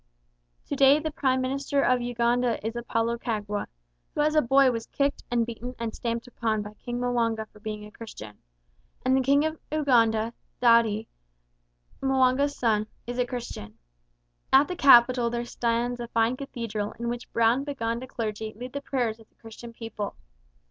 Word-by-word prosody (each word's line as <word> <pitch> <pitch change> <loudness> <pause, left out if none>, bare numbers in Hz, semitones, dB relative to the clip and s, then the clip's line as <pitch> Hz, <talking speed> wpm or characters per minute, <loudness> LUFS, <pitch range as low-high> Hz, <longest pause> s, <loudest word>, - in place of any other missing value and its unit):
To - - -3
day 275 +1 +6
the 310 0 -3
Prime 260 -3 +1
Minister 275 +2 0
of 250 -1 +3
Uganda 240 0 +1
is 225 - -2
Apolo 235 0 -1
Kagwa, 210 -3 -3 0.5
who - - +1
as 305 +1 +2
a 305 - +5
boy 270 +1 +5
was 230 -2 -4
kicked 280 0 -1
and 235 -1 +1
beaten 240 +2 -7
and 230 -1 -4
stamped 235 0 -3
upon 225 -4 -2
by 210 0 -9
King 240 +3 -5
M'wanga 230 -3 0
for 210 - -18
being 210 0 -6
a 210 - -12
Christian; 110 - -10 0.7
and 260 +1 +4
the 265 - +3
King 280 +3 +3
of 315 0 -3
Uganda, 230 -7 +2 0.3
Daudi, 230 -3 +4 1.0
M'wanga's 270 +1 +2
son, 215 -3 +1 0.2
is 245 +1 -5
a 250 - +1
Christian. 170 - -7 0.7
At 270 +2 +6
the 360 - -4
capital 245 -5 +6
there 240 0 -3
stands 240 +1 -1
a 240 - -4
fine 230 +1 +1
cathedral 230 -6 -4
in 235 +1 -4
which 240 +1 -5
brown 230 +3 +3
Baganda 250 -3 -3
clergy 220 -3 -4
lead 250 +3 -8
the 280 - -3
prayers 240 -5 -1
of 225 - -18
the - - -40
Christian 230 +1 -11
people. 225 -3 -6
235 Hz, 170 wpm, -27 LUFS, 225-260 Hz, 1.0 s, day